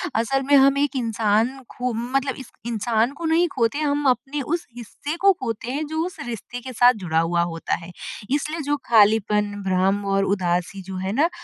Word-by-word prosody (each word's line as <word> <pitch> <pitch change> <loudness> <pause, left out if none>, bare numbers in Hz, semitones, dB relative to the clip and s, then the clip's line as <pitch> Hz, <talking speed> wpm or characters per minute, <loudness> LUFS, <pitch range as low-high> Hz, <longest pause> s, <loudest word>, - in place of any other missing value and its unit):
असल 250 +5 +1
में - - +8
हम 275 0 +6
एक 285 0 0
इंसान 225 +1 +1 0.2
खो 250 0 -1
मतलब 255 +4 -1
इस 265 - -10 0.2
इंसान 230 +1 +1
को 335 +4 -7
नहीं 330 +2 +3
खोते 235 +3 +1
हम 290 -1 0
अपने 270 +3 -1
उस 345 - -6
हिस्से 285 +7 -6
को 395 - +8
खोते 230 0 -3
हैं 295 +4 -2
जो 315 +1 -1
उस 360 - -7
रिश्ते 240 +1 -6
के 255 +1 -8
साथ 245 +2 +6
जुड़ा 160 -2 +1
हुआ 170 +1 +1
होता 165 -1 -2
है। 170 - -9 0.4
इसलिए 300 +3 -1
जो 290 +1 0
खालीपन, 210 -2 +3
भ्रम 190 +2 +1
और 195 - +2
उदासी 180 -1 -1
जो 190 0 -7
है 190 +1 -2
ना 305 +8 +3
240 Hz, 195 wpm, -23 LUFS, 205-280 Hz, 0.4 s, में